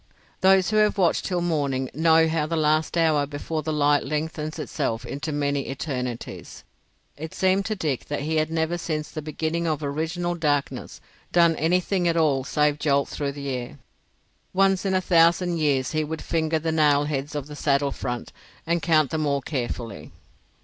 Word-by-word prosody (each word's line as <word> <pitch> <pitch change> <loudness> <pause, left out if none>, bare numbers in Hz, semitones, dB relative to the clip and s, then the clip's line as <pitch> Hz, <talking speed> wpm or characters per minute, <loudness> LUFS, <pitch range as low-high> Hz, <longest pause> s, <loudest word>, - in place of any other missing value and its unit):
Those 190 0 +4
who 215 - +2
have 210 -1 +3
watched 180 -4 +2
till 180 -2 -1
the - - -1
morning 140 -5 0
know 160 +1 +4
how 160 -1 0
the 165 - -2
last 155 +1 +1
hour 155 -3 +3
before 150 +2 -4
the 155 - -3
light 145 -1 +3
lengthens 155 0 -3
itself 125 -5 -3
into 145 +5 -4
many 145 -1 -1
eternities. 125 -3 -5 0.5
It 155 +2 -7
seemed 190 +1 +2
to 215 - -1
Dick 150 - -2
that 145 - -3
he 155 +2 -1
had 155 0 +1
never 165 +1 -1
since 155 -3 -3
the 155 - -5
beginning 160 +2 -2
of 155 -1 -1
original 165 +5 -2
darkness 145 -4 -2 0.3
done 170 -2 +4
anything 180 +3 +1
at 170 0 +1
all 145 -5 +2
save 150 +2 +1
jolt 140 -2 +1
through 140 -1 -3
the 140 -1 -5
air. 125 0 -4 0.8
Once 195 0 +2
in 190 - +1
a 185 - +2
thousand 170 0 +3
years 140 -4 +1
he 155 -1 0
would 160 +1 -5
finger 160 -1 0
the 160 +1 -2
nailheads 145 -2 +1
on 145 -2 -3
the 150 0 -9
saddle 140 -1 +1
front 120 -2 -5 0.3
and 170 +1 0
count 155 -4 +3
them 155 -1 0
all 140 -1 +1
carefully. 120 -4 -4
155 Hz, 180 wpm, -24 LUFS, 145-165 Hz, 0.8 s, Those